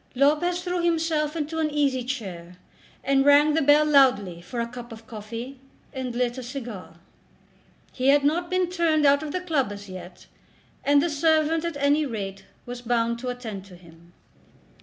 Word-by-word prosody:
Lopez 310 +7 +2
threw 355 -1 -1
himself 325 -2 0
into 320 0 -3
an 310 -1 +1
easy 280 -4 0
chair, 185 -9 -6 0.5
and 275 0 +3
rang 290 +2 +5
the 320 - +2
bell 290 +2 +5
loudly 250 - +3
for 235 +7 -6
a 235 - -1
cup 240 0 -10
of 225 0 -11
coffee, 230 +4 -8 0.3
and 255 -2 -4
lit 245 +1 -1
a - - -5
cigar. 240 -6 -8 1.0
He 255 0 -1
had 285 +1 +5
not 340 +4 +1
been 370 -1 +1
turned 335 -4 +1
out 285 +1 +5
of 305 -1 -5
the 365 - -2
club 300 - 0
as 205 0 -9
yet, 185 -1 -10 0.6
and 285 0 +4
the 345 - 0
servant 315 +1 +2
at 335 -4 -3
any 285 +2 +2
rate 195 -5 -6 0.2
was 245 0 -7
bound 235 -1 0
to 255 - -6
attend 225 -6 -6
to 190 -2 -14
him. 170 0 -18
270 Hz, 180 wpm, -25 LUFS, 230-305 Hz, 1.0 s, rang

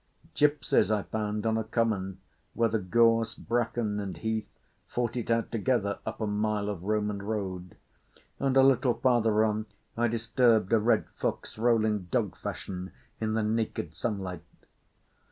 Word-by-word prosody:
Gipsies 145 -8 +3
I 105 -2 +1
found 105 -1 -3
on 110 0 +2
a - - -1
common 105 -4 -1 0.3
where 115 -1 +3
the 110 0 0
gorse, 115 +3 +3
bracken, 115 -2 -1
and 100 -2 -5
heath 110 -1 -2 0.4
fought 120 -1 -2
it 120 -2 -3
out 115 0 +1
together 110 -3 0
up 110 - -4
a 110 - -1
mile 105 0 0
of 100 -5 -4
Roman 105 -1 0
road; 95 -4 -4 0.6
and 135 -1 +1
a 135 - +7
little 130 -2 +4
farther 110 -4 +3
on 110 0 -1 0.3
I 120 +1 +2
disturbed 115 -2 +2
a 115 - +6
red 115 +3 +2
fox - - -2
rolling 110 -4 +2
dog 85 - -1
fashion 95 0 -6 0.3
in 110 0 -1
the 110 - +1
naked 110 -7 -1
sunlight. 95 -2 -3
110 Hz, 155 wpm, -29 LUFS, 105-115 Hz, 0.6 s, a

